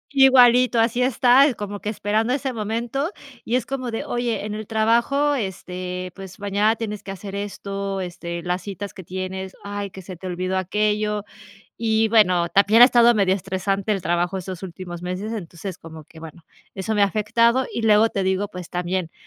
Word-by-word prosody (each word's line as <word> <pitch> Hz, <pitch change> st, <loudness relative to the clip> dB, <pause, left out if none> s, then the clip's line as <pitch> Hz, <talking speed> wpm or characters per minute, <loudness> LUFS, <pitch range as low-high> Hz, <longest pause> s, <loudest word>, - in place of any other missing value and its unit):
Igualito, 250 Hz, -2 st, +6 dB
así 235 Hz, +2 st, +2 dB
está, 255 Hz, +2 st, +5 dB
eh, 265 Hz, -, -1 dB
como 205 Hz, -1 st, -6 dB
que 210 Hz, -, -4 dB
esperando 215 Hz, +3 st, 0 dB
ese 265 Hz, -1 st, -2 dB
momento 235 Hz, -, -2 dB, 0.3 s
y 235 Hz, -, 0 dB
es 255 Hz, -, 0 dB
como 255 Hz, -2 st, -4 dB
de: 225 Hz, -, -4 dB
"Oye, 240 Hz, -3 st, -2 dB
en 210 Hz, -, -4 dB
el 215 Hz, 0 st, -6 dB
trabajo, 235 Hz, +7 st, +2 dB
este, 185 Hz, -3 st, -5 dB
pues, 195 Hz, +1 st, -10 dB
mañana 205 Hz, +2 st, +1 dB
tienes 210 Hz, -2 st, -5 dB
que 195 Hz, -, -7 dB
hacer 195 Hz, +1 st, -7 dB
esto, 200 Hz, -1 st, -4 dB
este, 170 Hz, -1 st, -5 dB
las 180 Hz, +1 st, -2 dB
citas 200 Hz, 0 st, -6 dB
que 185 Hz, -, -10 dB
tienes. 190 Hz, +1 st, -5 dB
Ay, 205 Hz, 0 st, -4 dB
que 190 Hz, -, -10 dB
se 185 Hz, 0 st, -8 dB
te 180 Hz, -, -12 dB
olvidó 185 Hz, +1 st, -2 dB
aquello". 210 Hz, +2 st, 0 dB, 0.5 s
Y 220 Hz, -1 st, +2 dB
bueno, 180 Hz, -6 st, +4 dB
también 210 Hz, +4 st, +5 dB
ha -, -, +13 dB
estado 240 Hz, -2 st, +5 dB
medio 195 Hz, -2 st, +3 dB
estresante 195 Hz, +2 st, -2 dB
el 195 Hz, -3 st, 0 dB
trabajo 175 Hz, +3 st, 0 dB
estos 185 Hz, -1 st, -6 dB
últimos 175 Hz, -1 st, -7 dB
meses, 185 Hz, +5 st, -4 dB
entonces, 185 Hz, -3 st, -6 dB
como 160 Hz, -1 st, -11 dB
que, 160 Hz, -, -15 dB
bueno, 160 Hz, +1 st, -11 dB, 0.3 s
eso 195 Hz, +3 st, -2 dB
me 205 Hz, -, +2 dB
ha -, -, +6 dB
afectado, 230 Hz, +5 st, +2 dB
y 235 Hz, -, -3 dB
luego 220 Hz, +1 st, +5 dB
te 195 Hz, -, -2 dB
digo, 190 Hz, +2 st, 0 dB
pues, 180 Hz, -4 st, -9 dB
también, 180 Hz, -1 st, -2 dB
205 Hz, 190 wpm, -22 LUFS, 185-225 Hz, 0.5 s, ha